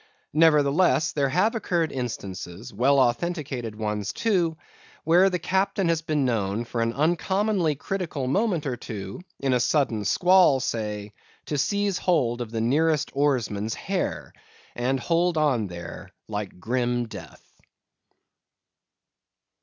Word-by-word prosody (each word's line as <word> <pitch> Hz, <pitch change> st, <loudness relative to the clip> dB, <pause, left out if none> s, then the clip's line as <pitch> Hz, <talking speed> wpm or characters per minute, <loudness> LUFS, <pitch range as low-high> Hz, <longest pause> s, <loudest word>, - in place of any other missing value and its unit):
Nevertheless 155 Hz, +1 st, +4 dB
there 140 Hz, -2 st, 0 dB
have 185 Hz, +10 st, +2 dB
occurred 175 Hz, -8 st, 0 dB
instances, 105 Hz, -3 st, -6 dB
well 130 Hz, +7 st, +3 dB
authenticated 130 Hz, -3 st, -1 dB
ones 105 Hz, -1 st, -2 dB
too, 180 Hz, -8 st, +1 dB, 0.5 s
where 180 Hz, +4 st, +5 dB
the 180 Hz, -, -1 dB
captain 190 Hz, +1 st, 0 dB
has 165 Hz, -1 st, +1 dB
been 155 Hz, -4 st, 0 dB
known 110 Hz, -2 st, -1 dB
for 115 Hz, 0 st, -3 dB
an 115 Hz, 0 st, +1 dB
uncommonly 175 Hz, -, +1 dB
critical 160 Hz, -3 st, -3 dB
moment 175 Hz, -, 0 dB
or 130 Hz, -3 st, -1 dB
two, 100 Hz, -, -7 dB, 0.2 s
in 135 Hz, -2 st, +1 dB
a 125 Hz, -, +3 dB
sudden 120 Hz, -4 st, +1 dB
squall 180 Hz, -, +4 dB
say—to 105 Hz, +3 st, -5 dB
seize 200 Hz, +6 st, 0 dB
hold 125 Hz, -9 st, +1 dB
of 120 Hz, -, -4 dB
the 115 Hz, 0 st, -3 dB
nearest 150 Hz, +5 st, +1 dB
oarsman's 115 Hz, -7 st, 0 dB
hair, -, -, -3 dB, 0.4 s
and 130 Hz, +2 st, 0 dB
hold 170 Hz, +5 st, +1 dB
on 135 Hz, -9 st, +2 dB
there 85 Hz, -2 st, -8 dB, 0.2 s
like 105 Hz, -3 st, -5 dB
grim 120 Hz, +2 st, -1 dB
death. 95 Hz, -8 st, -12 dB
135 Hz, 125 wpm, -25 LUFS, 115-170 Hz, 0.5 s, where